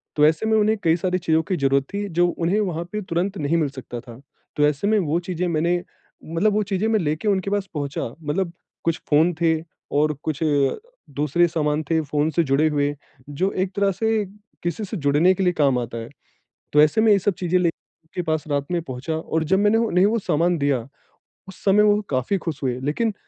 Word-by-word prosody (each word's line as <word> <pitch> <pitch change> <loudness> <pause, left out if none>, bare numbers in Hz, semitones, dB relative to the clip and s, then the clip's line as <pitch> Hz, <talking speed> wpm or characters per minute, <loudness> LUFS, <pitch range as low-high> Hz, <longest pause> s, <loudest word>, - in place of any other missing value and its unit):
तो 150 - +5
ऐसे 160 +6 +2
में 220 0 +3
उन्हें 215 +1 +3
कई 165 -1 +4
सारी 180 +1 0
चीज़ों 160 -2 +2
की 185 +2 -2
ज़रूरत 135 -1 +2
थी 205 0 -2
जो 175 0 +2
उन्हें 175 +5 0
वहाँ 175 -5 -1
पे 210 - -3
तुरंत 185 +2 -2
नहीं 150 +3 0
मिल 155 -4 +1
सकता 130 -3 -8
था। 120 0 -13 0.3
तो 150 - +3
ऐसे 150 +7 -1
में 215 0 +3
वो 165 -1 0
चीज़ें 180 0 -1
मैंने 170 +2 +1 0.4
मतलब 170 +6 +1
वो 215 - +2
चीज़ें 200 +2 -1
मैं 220 -1 +2
लेके 155 +4 -2
उनके 195 -1 +1
पास 205 -1 -1
पहुँचा, 145 -3 -3 0.2
मतलब 170 +4 -1 0.3
कुछ 165 -1 0
फ़ोन 160 +4 +4
थे 165 -1 +4 0.4
और 150 +1 +3
कुछ 155 -3 -2 0.8
दूसरे 150 +4 +2
सामान 155 -2 -1
थे 165 -1 +3
फ़ोन 150 +1 0
से 170 - +2
जुड़े 145 +2 +2
हुए, 145 -1 0 0.3
जो 185 +7 -1
एक 185 0 -1
तरह 200 -1 +2
से 220 +2 0 0.4
किसी 175 +6 -2
से 205 +1 -5
जुड़ने 150 +5 +3
के 190 +1 -2
लिए 180 - +2
काम 140 -4 +3
आता 115 -1 -5
है। 115 - -6 0.6
तो 150 - +6
ऐसे 155 +8 +3
मैं 220 -1 +5
ये 200 - +5
सब 200 +2 +1
चीज़े 180 0 +1
लेके 170 0 -4
पास 160 -2 -2
रात 140 -1 -1
में 175 - +1
पहुँचा, 135 +3 -4
और 160 0 -2
जब 190 +5 +2
मैंने 210 +2 +3
वो 230 - +2
उन्हें 180 0 +3
वो 230 +2 +1
सामान 170 -2 +1
दिया, 140 -4 0 0.6
उस 190 - -13
समय 205 +1 +5
वो 210 0 +4
काफ़ी 130 +9 0
खुश 160 -6 -5
हुए। 125 -1 -1
लेकिन 155 - -1
165 Hz, 215 wpm, -22 LUFS, 150-195 Hz, 0.8 s, तो